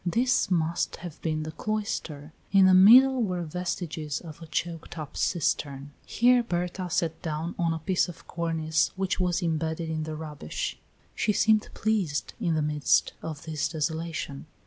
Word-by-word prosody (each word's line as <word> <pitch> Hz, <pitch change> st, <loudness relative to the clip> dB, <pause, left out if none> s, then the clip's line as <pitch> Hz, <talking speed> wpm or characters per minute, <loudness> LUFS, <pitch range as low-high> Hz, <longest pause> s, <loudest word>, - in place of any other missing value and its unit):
This 235 Hz, +8 st, +2 dB
must 170 Hz, -2 st, 0 dB
have 175 Hz, -4 st, -9 dB
been 155 Hz, -1 st, -1 dB
the 155 Hz, -, -5 dB
cloister, 160 Hz, -7 st, -4 dB, 0.2 s
in 195 Hz, -1 st, +6 dB
the 185 Hz, -, +6 dB
middle 250 Hz, +8 st, +8 dB
were 180 Hz, -5 st, -1 dB
vestiges 165 Hz, -3 st, -3 dB
of 165 Hz, -1 st, -11 dB
a 165 Hz, -, -9 dB
choked 165 Hz, +1 st, -4 dB
up 155 Hz, -2 st, -7 dB
cistern. 140 Hz, -4 st, -1 dB, 0.2 s
Here 245 Hz, +1 st, +4 dB
Berta 180 Hz, -3 st, -3 dB
sat 165 Hz, -1 st, -1 dB
down 160 Hz, +2 st, -3 dB
on 170 Hz, -1 st, +2 dB
a 165 Hz, -, -1 dB
piece 180 Hz, +3 st, 0 dB
of 165 Hz, -, -11 dB
cornice 160 Hz, -2 st, 0 dB
which 190 Hz, 0 st, -1 dB
was 180 Hz, 0 st, +1 dB
imbedded 160 Hz, 0 st, -1 dB
in 155 Hz, 0 st, -2 dB
the 155 Hz, 0 st, -4 dB
rubbish. 150 Hz, -, -5 dB, 0.3 s
She 210 Hz, -, +1 dB
seemed 215 Hz, +1 st, +3 dB
pleased 200 Hz, -9 st, -1 dB
in 170 Hz, -6 st, +1 dB
the 155 Hz, -, +1 dB
midst 150 Hz, -1 st, +2 dB
of 155 Hz, -3 st, -6 dB
this 155 Hz, -2 st, -1 dB
desolation. 160 Hz, -2 st, -3 dB
165 Hz, 165 wpm, -27 LUFS, 155-185 Hz, 0.3 s, middle